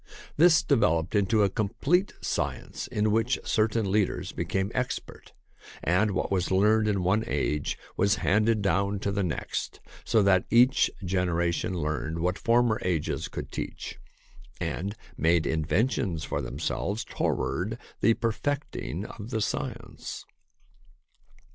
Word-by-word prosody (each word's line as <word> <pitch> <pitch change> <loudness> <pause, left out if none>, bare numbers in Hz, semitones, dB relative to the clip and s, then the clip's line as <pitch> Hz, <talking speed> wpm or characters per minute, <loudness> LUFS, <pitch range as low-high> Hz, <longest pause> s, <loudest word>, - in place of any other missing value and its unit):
This 160 0 +6
developed 90 - +2
into 105 +1 +3
a 100 - +3
complete 140 - +1
science - - -3
in 105 0 0
which 115 +4 +2
certain 110 -2 +1
leaders 105 -2 0
became 95 +1 -2
expert, 125 0 -4 0.5
and 90 +6 +3
what 95 0 -2
was 90 -2 +1
learned 105 +3 +3
in 100 -3 +1
one 100 +5 +2
age 75 -1 -1 0.2
was 100 +1 +3
handed 110 +1 +3
down 100 +1 +1
to 100 - -1
the 100 0 0
next, 85 -6 -3 0.2
so 110 -2 +3
that 95 -2 +4
each 125 +3 +5 0.2
generation 90 -1 0
learned 75 0 -2
what 90 +3 -1
former 115 -1 +3
ages 85 -4 -1
could - - -7
teach, - - -6 0.6
and 100 +4 -3 0.2
made 85 0 +3
inventions 85 - 0
for 70 - -2
themselves 80 - -2
toward 105 +6 -1 0.2
the 115 - +4
perfecting 115 - -2
of 110 0 -8
the 115 -3 -1
science. 105 - -4
100 Hz, 130 wpm, -27 LUFS, 90-110 Hz, 0.6 s, This